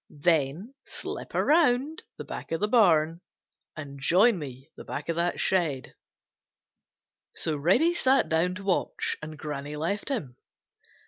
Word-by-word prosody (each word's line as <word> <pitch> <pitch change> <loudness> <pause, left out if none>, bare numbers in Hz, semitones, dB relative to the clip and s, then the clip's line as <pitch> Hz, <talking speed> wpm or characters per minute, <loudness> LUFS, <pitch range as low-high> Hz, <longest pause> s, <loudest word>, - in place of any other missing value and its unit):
Then 160 - 0
slip - - -7
around 300 0 +2 0.2
back - - -7
of 165 - -1
the 210 - +1
barn 170 -7 +3 0.6
and 140 -3 -8
join 190 - +4
me 135 0 -9
back - - -7
of 165 - 0
that 175 +1 0
shed." 160 -8 0 1.4
So 155 - -1
Reddy 190 - +3
sat 270 -5 +3
down 170 +3 +1
to 195 - -8
watch, 195 -2 -1
and 155 0 -8
Granny 145 0 -5
left 170 - -2
him. 150 - -4
170 Hz, 130 wpm, -27 LUFS, 150-215 Hz, 1.4 s, join